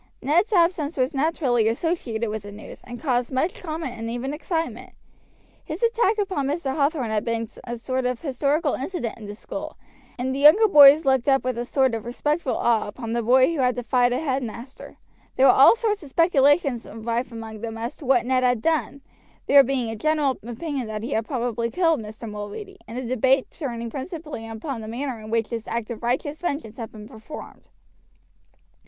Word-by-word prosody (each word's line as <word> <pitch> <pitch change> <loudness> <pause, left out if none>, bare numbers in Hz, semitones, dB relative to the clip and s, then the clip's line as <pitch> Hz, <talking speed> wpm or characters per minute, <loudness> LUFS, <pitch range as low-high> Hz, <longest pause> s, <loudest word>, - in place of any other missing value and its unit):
Ned's 345 - +2
absence 335 -5 +2
was 255 0 +1
naturally 270 -6 +1
associated 230 -4 -1
with 215 0 -4
the 205 +1 -10
news, 205 +1 -11
and 245 -1 -8
caused 250 -4 0
much 265 +7 -1
comment 315 -6 -4
and 225 0 -4
even 245 +4 -3
excitement. 325 +1 -4 0.7
His 320 +7 -6
attack 460 -2 +2
upon 375 -10 -1
Mr. 285 -2 -2
Hathorn 280 -5 0
had 215 -1 0
become 230 -1 -2 0.2
a 240 0 -5
sort 255 +2 -2
of 250 -2 -2
historical 285 +1 0
incident 265 -5 -4
in 210 - -9
the 205 - -7
school, 305 +7 -7 0.4
and 260 +1 -2
the 270 - -3
younger 310 +10 +7
boys 295 -3 +8
looked 265 0 +2
up 270 0 +3
with 255 -1 -1
a 240 - -2
sort 265 -1 +2
of 225 -2 -3
respectful 295 +4 -1
awe 230 -2 +2
upon 225 +2 -6
the 235 - 0
boy 255 +6 +4
who 315 - -3
had 250 -1 +2
defied 245 0 +2
a 250 - +1
headmaster. 260 -3 -5 0.4
There 265 - +4
were 260 - +9
all 270 - +7
sorts 430 -3 -1
of 295 - -11
speculations 285 -4 +3
rife 230 +3 -3
among 220 -2 -8
them 225 -1 -5
as 230 +2 -5
to 290 - -11
what 250 -3 +3
Ned 255 0 +2
had 245 -2 +2
done, 315 -3 0 0.4
there 280 - +8
being 255 -3 -1
a - - -5
general 290 +2 +1
opinion 255 +3 -4
that 215 0 -5
he 245 - -4
had 220 -3 -1
probably 235 -3 -2
killed 330 +2 +2
Mr. 220 +2 -9
Mulready, 210 - -7
and 230 +3 -7
the 255 - -3
debate 260 +2 +2
turning 235 -6 -5
principally 295 - -6
upon 225 +3 -5
the 215 - -8
manner 245 +1 -4
in 215 0 -10
which 225 -1 0
this 230 -2 -5
act 235 0 -3
of 230 - -6
righteous 260 +5 -2
vengeance 285 -10 -3
had 225 -3 -6
been 210 -1 -11
performed. 220 +7 -11
260 Hz, 195 wpm, -24 LUFS, 230-300 Hz, 0.7 s, were